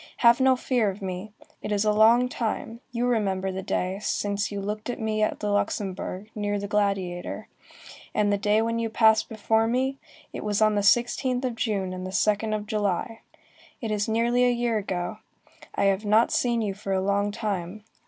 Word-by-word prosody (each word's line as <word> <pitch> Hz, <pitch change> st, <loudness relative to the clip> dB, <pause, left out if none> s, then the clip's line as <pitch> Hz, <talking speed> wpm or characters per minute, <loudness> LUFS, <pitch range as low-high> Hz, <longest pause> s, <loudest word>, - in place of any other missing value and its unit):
Have 235 Hz, +1 st, +7 dB
no 260 Hz, 0 st, +5 dB
fear 245 Hz, -4 st, +1 dB
of 195 Hz, +1 st, -7 dB
me. 185 Hz, +3 st, -5 dB, 0.3 s
It -, -, -5 dB
is 205 Hz, 0 st, +1 dB
a 210 Hz, -, +4 dB
long 225 Hz, +4 st, +5 dB
time, 230 Hz, -1 st, -4 dB
you 240 Hz, 0 st, -1 dB
remember 195 Hz, -5 st, 0 dB
the 190 Hz, +1 st, -4 dB
day, 185 Hz, +1 st, -2 dB
since 205 Hz, 0 st, -1 dB
you 200 Hz, -, -3 dB
looked 210 Hz, +3 st, -4 dB
at 245 Hz, -, -3 dB
me 215 Hz, -1 st, -1 dB
at 215 Hz, -, 0 dB
the 210 Hz, -1 st, -1 dB
Luxembourg, 200 Hz, 0 st, -2 dB
near 205 Hz, -1 st, -1 dB
the 200 Hz, 0 st, -4 dB
Gladiator. 195 Hz, -4 st, -1 dB, 0.7 s
And 205 Hz, -1 st, +2 dB
the -, -, +2 dB
day 210 Hz, +1 st, +2 dB
when 230 Hz, 0 st, -1 dB
you 230 Hz, -1 st, -1 dB
passed 220 Hz, -1 st, +4 dB
before 220 Hz, +1 st, +1 dB
me? 260 Hz, +3 st, 0 dB, 0.3 s
It -, -, -5 dB
was 210 Hz, -1 st, 0 dB
on 215 Hz, -1 st, +4 dB
the 205 Hz, -, +1 dB
16th 245 Hz, +4 st, +2 dB
of 250 Hz, -, -1 dB
June 200 Hz, -5 st, -1 dB
and 185 Hz, 0 st, -6 dB
the 185 Hz, -, -4 dB
2d 210 Hz, +2 st, +1 dB
of 210 Hz, -1 st, -4 dB
July. 210 Hz, +1 st, -2 dB, 0.6 s
It 225 Hz, -3 st, -4 dB
is 210 Hz, 0 st, -1 dB
nearly 235 Hz, +2 st, +2 dB
a 250 Hz, -, +5 dB
year 240 Hz, -2 st, 0 dB
ago. 185 Hz, -3 st, -4 dB, 0.6 s
I -, -, 0 dB
have 195 Hz, +1 st, +2 dB
not 215 Hz, +3 st, +3 dB
seen 235 Hz, -2 st, +1 dB
you 200 Hz, -2 st, -1 dB
for 195 Hz, 0 st, -4 dB
a 190 Hz, -, +2 dB
long 200 Hz, +2 st, +1 dB
time. 205 Hz, -2 st, -4 dB
210 Hz, 200 wpm, -26 LUFS, 200-230 Hz, 0.7 s, Have